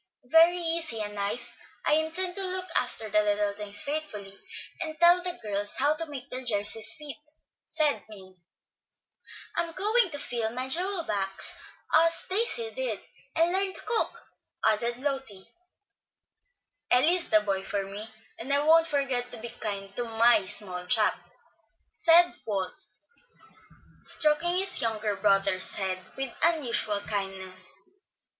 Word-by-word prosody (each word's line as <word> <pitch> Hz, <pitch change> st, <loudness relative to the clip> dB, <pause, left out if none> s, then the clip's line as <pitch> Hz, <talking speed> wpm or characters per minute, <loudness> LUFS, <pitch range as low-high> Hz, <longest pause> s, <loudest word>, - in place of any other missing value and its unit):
"Very 330 Hz, +2 st, +6 dB
easy 330 Hz, -8 st, -1 dB
and 210 Hz, -1 st, -4 dB
nice. 210 Hz, +4 st, -3 dB, 0.3 s
I -, -, +4 dB
intend 330 Hz, +4 st, 0 dB
to 390 Hz, -, 0 dB
look 370 Hz, 0 st, -1 dB
after 235 Hz, -3 st, 0 dB
little 210 Hz, -1 st, +1 dB
things 205 Hz, 0 st, 0 dB
faithfully, 250 Hz, -10 st, -5 dB, 0.5 s
and 315 Hz, -1 st, -5 dB
tell 345 Hz, +1 st, +6 dB
the 360 Hz, -1 st, -2 dB
girls 205 Hz, 0 st, -2 dB
how 290 Hz, +3 st, +4 dB
to 325 Hz, +1 st, -4 dB
make 275 Hz, -3 st, -8 dB
their 255 Hz, -, -4 dB
jerseys 220 Hz, 0 st, +3 dB
fit," 295 Hz, -2 st, -8 dB, 0.5 s
said 310 Hz, -3 st, +2 dB
Min. 190 Hz, -3 st, -13 dB, 1.2 s
"I'm 335 Hz, -1 st, -2 dB
going 425 Hz, +3 st, +2 dB
to 290 Hz, -, -5 dB
fill 235 Hz, -5 st, -3 dB
my 255 Hz, +1 st, -3 dB
jewel 360 Hz, +4 st, +1 dB
box 195 Hz, -6 st, -2 dB, 0.4 s
as 330 Hz, +1 st, +3 dB
Daisy 455 Hz, +3 st, +2 dB
did, -, -, -3 dB, 0.4 s
and 330 Hz, +1 st, +3 dB
learn 385 Hz, +1 st, +1 dB
to -, -, -5 dB
cook," 460 Hz, -, 0 dB, 0.5 s
added 235 Hz, +2 st, +1 dB
Lotty. 265 Hz, -8 st, -4 dB, 1.5 s
"Eli 260 Hz, +7 st, +5 dB
is 360 Hz, -2 st, +1 dB
the 215 Hz, -, +5 dB
boy 195 Hz, -2 st, -2 dB
for 200 Hz, 0 st, -2 dB
me, 205 Hz, +3 st, -9 dB, 0.3 s
and 245 Hz, +5 st, -5 dB
I 285 Hz, +1 st, +3 dB
won't 325 Hz, +1 st, +5 dB
forget 270 Hz, -5 st, -1 dB
to -, -, -9 dB
be 235 Hz, +2 st, -7 dB
kind 200 Hz, -3 st, -6 dB
to 245 Hz, -, -1 dB
my 225 Hz, -3 st, +3 dB
small 185 Hz, -3 st, -1 dB
chap," 220 Hz, -1 st, +3 dB, 0.8 s
said 345 Hz, +1 st, +5 dB
Walt, 195 Hz, -3 st, -2 dB, 1.3 s
stroking 325 Hz, +3 st, +1 dB
his 385 Hz, +1 st, +3 dB
younger 215 Hz, -2 st, -1 dB
brother's 195 Hz, -2 st, +2 dB
head 190 Hz, -2 st, -1 dB, 0.2 s
with 270 Hz, -2 st, -3 dB
unusual 240 Hz, -10 st, +2 dB
kindness. 190 Hz, -2 st, -4 dB
245 Hz, 140 wpm, -27 LUFS, 205-330 Hz, 1.5 s, Very